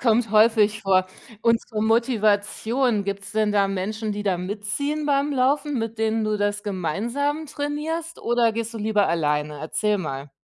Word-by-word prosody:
kommt 230 -2 +2
häufig 215 -1 +4
vor. 185 -1 +3 0.3
Und 230 0 +3
zur 220 -3 -5
Motivation, 225 0 +1
gibt's 200 0 -4
denn 215 -1 +1
da 200 -1 +3
Menschen, 210 +3 -3
die 205 0 -4
da 190 -3 +1
mitziehen 215 +11 -3
beim 280 0 +2
Laufen, 280 +1 +1
mit 225 0 -3
denen 220 0 +1
du 215 0 0
das 205 0 -1
gemeinsam 235 - -2
trainierst? 305 +4 -4
Oder 235 -1 +2
gehst 230 +1 -4
du - - -4
lieber 210 -1 +2
alleine? 150 -2 -1
Erzähl 210 +7 0
mal. 140 -6 -5
215 Hz, 160 wpm, -23 LUFS, 200-240 Hz, 0.3 s, häufig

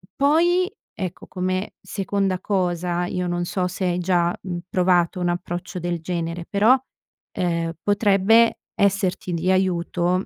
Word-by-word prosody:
poi, 345 +7 +3 0.2
ecco, 185 -3 -6
come 185 +1 -2
seconda 195 -2 -1
cosa, 180 -3 -1
io 180 0 -2
non 175 0 -1
so 180 0 -1
se 185 +1 -3
hai 175 0 +1
già, 175 -1 +2
mhmm, 175 -2 -4
provato 180 0 +2
un 175 - +1
approccio 175 +1 -4
del 175 0 -2
genere, 170 0 -3
però, 220 +6 +5 0.6
ehm, 170 -2 -1
potrebbe 205 +2 +4 0.2
esserti 195 -3 +1
di 175 +3 +1
aiuto 180 0 +1
180 Hz, 135 wpm, -23 LUFS, 175-195 Hz, 0.6 s, però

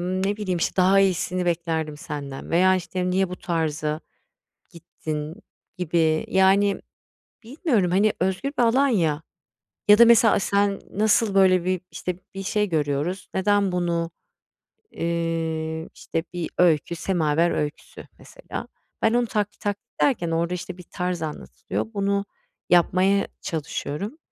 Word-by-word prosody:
ne 185 +3 -1
bileyim, 185 -5 -2
işte, - - -1
"Daha 190 +1 +5
iyisini 185 -1 +1
beklerdim 160 -3 -1
senden." 145 -3 -7
veya, 185 +3 +4
işte, 180 0 -2
"Niye 190 0 +1
bu 180 - -6
tarza 155 -2 -2 0.7
gittin?" 155 -2 -6 0.4
gibi, 160 -2 +1
yani, 195 +1 +3 0.6
bilmiyorum. 235 - 0
Hani, 200 +3 +3
özgür 190 +9 -1
bir - - +4
alan 260 +5 +4
ya, 165 - +1 0.7
ya 210 - +8
da 235 - +9
mesela 230 -2 +6
sen 200 0 +1
nasıl, 215 0 +2
böyle, 185 -2 +5
bir, 185 -1 0
işte, 180 -1 -4 0.2
bir 195 - -4
şey 210 +1 0
görüyoruz, 155 +3 -1
neden 200 0 +2
bunu, 170 -2 -1 0.8
iii, 165 -1 -2
işte, 165 +1 -4
bir 175 -2 -4
öykü 170 -1 +3
Semaver 165 -2 +1
öyküsü 150 -1 -4
mesela. - - -8 0.4
Ben 225 +1 +3
onu 245 0 +2
taklit 210 -2 -2
tak 205 -1 -1 0.2
ederken 195 -12 +2
ben 165 - +1
orada, 170 +2 0
işte, 180 +1 -6
bir - - -9
tarz 180 0 -3
anlatılıyor. 155 +6 -4
Bunu 200 0 0 0.5
yapmaya 185 +3 +3
çalışıyorum. 165 - -4
180 Hz, 135 wpm, -24 LUFS, 165-200 Hz, 0.8 s, da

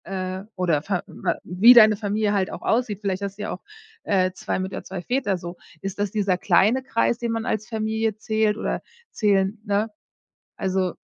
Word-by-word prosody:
Äh. 185 0 -4
Oder 170 -5 +1
Verwa 185 +2 -3
wie 195 +8 +7
deine 215 -3 +8
Familie 210 0 0
halt 195 -2 0
auch - - -7
aussieht. 225 -4 0
Vielleicht 195 -2 -2
hast 200 -1 -4
du 210 - -5
ja - - -3
auch, 180 - -6 0.4
äh, 185 -2 +2
2 - - -3
Mütter, 190 +1 -4
2 185 -1 -6
Väter 245 -2 0
so. 175 0 -8 0.2
Ist 195 0 -5
das 205 -1 0
dieser 200 -4 +1
kleine 230 +8 +3
Kreis, 235 -1 +1
den 235 -1 -2
man 225 0 -2
als 215 0 -2
Familie 220 -1 -1
zählt 215 -1 0
oder - - -2 0.3
zählen 200 -1 +1
ne? 205 +2 0 0.7
Also 190 -2 -1
205 Hz, 185 wpm, -24 LUFS, 190-220 Hz, 0.7 s, deine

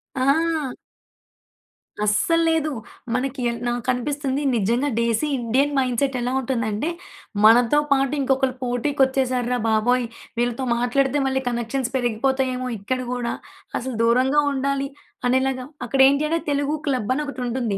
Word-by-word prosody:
ఆ! 290 +1 +1 1.3
అస్సల్లేదు. 325 - +2 0.4
మనకి 260 +1 -2
య 235 - +1 0.2
నాకనిపిస్తుంది 260 +3 -1
నిజంగా 235 +7 +1
డేసీ 235 +5 +1
ఇండియన్ 265 +5 +1
మైండ్సెట్ 260 +1 +1
ఎలా 245 +1 -1
ఉంటుందంటే, 235 +1 -1 0.6
మనతో 240 +5 +6
పాటు 275 0 +3
ఇంకొకలు 265 -1 +1
పోటీకొచ్చేసారు 255 0 +1
రా 245 - 0
బాబోయ్! 240 +3 +2 0.3
వీళ్ళతో 240 +2 0
మాట్లాడితే 265 +4 +1
మళ్ళి 265 0 0
కనెక్షన్ 240 +2 -2
పెరిగిపోతాయేమో 255 +1 0
ఇక్కడ 255 +6 -2
గూడా 245 -1 -2 0.5
అసలు 255 -1 -5
దూరంగా 255 +5 +3
ఉండాలి 275 0 -1 0.4
అనేలాగా 260 0 +1 0.2
అక్కడేంటి 275 +3 +4
అంటే 330 - +1
తెలుగు 285 +1 0
క్లబని 255 +1 0
ఒకటుంటుంది. 245 -6 -2
260 Hz, 110 wpm, -23 LUFS, 240-275 Hz, 1.3 s, మనతో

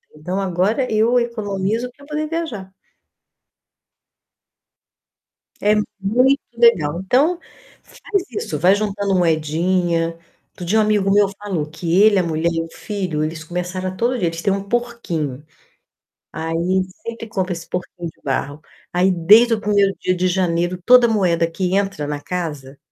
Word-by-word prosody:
então 180 +6 -4
agora 195 +7 0
eu 225 +3 +3
economizo 220 0 -2
pra 280 - -16
poder 305 +1 -3
viajar. 260 - -4 2.9
É 210 +1 +3 0.2
muito 250 +8 +3 0.2
legal. 175 -8 +3
Então, 295 - +3 0.5
faz 395 -5 -3
isso, 155 -8 -3
vai 180 +6 +4
juntando 205 -1 -1
moedinha. 165 +1 +1 0.3
Outro 180 - -9
dia 220 +5 +2
um - - +5
amigo 210 -2 +2
meu 205 0 +5
falou 190 -7 -3
que 170 +3 0
ele, 210 -2 +6
a 180 - +3
mulher 165 0 0
e 165 - -1
o 165 - -10
filho, 185 -7 -3
eles 160 +1 -4
começaram 180 +2 -4
a - - -5
todo 245 +5 0
dia 175 - 0
eles 165 0 -6
têm 195 - +1
um 195 0 -3
porquinho. 185 - -3 0.9
Aí, 160 +1 -3 0.5
sempre 230 0 -6
compra 190 -4 -2
esse 170 -1 -8
porquinho 180 -1 -5
de - - -20
barro. 145 +1 -2 0.3
Aí, 180 +2 +3
desde 210 +7 +6
o 220 - -1
primeiro 200 -2 +2
dia 185 - 0
de 185 +1 +1
janeiro, 175 -1 0
toda 250 -1 +7
moeda 170 -6 +1
que 180 +2 -1
entra 195 -7 -1
na 145 -1 -3
casa, 150 -7 -5
190 Hz, 150 wpm, -20 LUFS, 170-215 Hz, 2.9 s, toda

